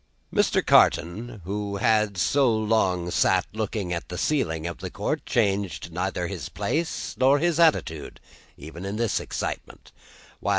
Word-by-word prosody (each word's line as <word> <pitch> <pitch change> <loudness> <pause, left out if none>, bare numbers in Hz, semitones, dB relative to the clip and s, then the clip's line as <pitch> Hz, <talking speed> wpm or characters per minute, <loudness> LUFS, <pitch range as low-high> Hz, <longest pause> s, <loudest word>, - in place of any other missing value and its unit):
Mr. - - +2
Carton, 105 +7 +3
who 100 +1 -3
had 110 -2 +2
so 135 +7 +3
long 105 -5 +1
sat - - +3
looking 105 -4 -3
at 85 - -5
the 90 - -5
ceiling 80 - 0
of 85 -2 -5
the - - -5
court, - - -3
changed 100 -6 0
neither 90 +1 -2
his - - -5
place 165 +1 -2
nor 135 +2 +5
his 170 +1 +1
attitude, 115 - +1 0.4
even 80 +5 -9
in 100 +1 -4
this 115 -1 0
excitement. - - -6
100 Hz, 140 wpm, -25 LUFS, 90-115 Hz, 0.4 s, nor